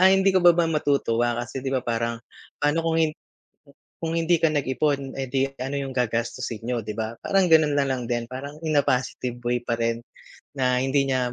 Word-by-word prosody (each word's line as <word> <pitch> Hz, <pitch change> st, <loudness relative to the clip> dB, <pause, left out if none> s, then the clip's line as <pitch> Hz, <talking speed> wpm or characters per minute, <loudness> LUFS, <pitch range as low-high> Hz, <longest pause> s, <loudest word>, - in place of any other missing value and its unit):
"Ay, 190 Hz, +1 st, +7 dB
hindi 195 Hz, 0 st, +3 dB
ka -, -, +5 dB
ba 175 Hz, -, +9 dB
ba 170 Hz, -, +3 dB
matutuwa 140 Hz, -6 st, +1 dB
kasi, 120 Hz, +2 st, -4 dB
‘di 135 Hz, -, -1 dB
ba, 130 Hz, -, +1 dB
parang 115 Hz, 0 st, -1 dB, 0.4 s
paano 145 Hz, +3 st, +2 dB
kung 165 Hz, 0 st, +1 dB
hin 155 Hz, -1 st, +2 dB, 0.9 s
kung 165 Hz, 0 st, -2 dB
hindi 165 Hz, 0 st, +2 dB
ka 165 Hz, -, +4 dB
nag-ipon, 140 Hz, -1 st, 0 dB
eh 135 Hz, -, -2 dB
di 135 Hz, +1 st, +1 dB, 0.2 s
ano 135 Hz, +2 st, -3 dB
yung 135 Hz, -1 st, -3 dB
gagastusin 120 Hz, -2 st, -2 dB
niyo?" 120 Hz, 0 st, -1 dB
‘Di 105 Hz, -1 st, -6 dB
ba? 110 Hz, 0 st, -3 dB
Parang 190 Hz, -3 st, +2 dB
ganun 155 Hz, -2 st, +5 dB
nalang 135 Hz, -4 st, 0 dB
din, 120 Hz, -1 st, -1 dB
parang 140 Hz, +3 st, -6 dB
in 155 Hz, -2 st, +2 dB
positive 125 Hz, -1 st, -1 dB
way 120 Hz, 0 st, +1 dB
pa 120 Hz, -1 st, -2 dB
rin 115 Hz, 0 st, -1 dB, 0.5 s
na 130 Hz, -2 st, +1 dB
hindi 135 Hz, +1 st, +1 dB
niya 125 Hz, -2 st, 0 dB
135 Hz, 200 wpm, -24 LUFS, 120-150 Hz, 0.9 s, ba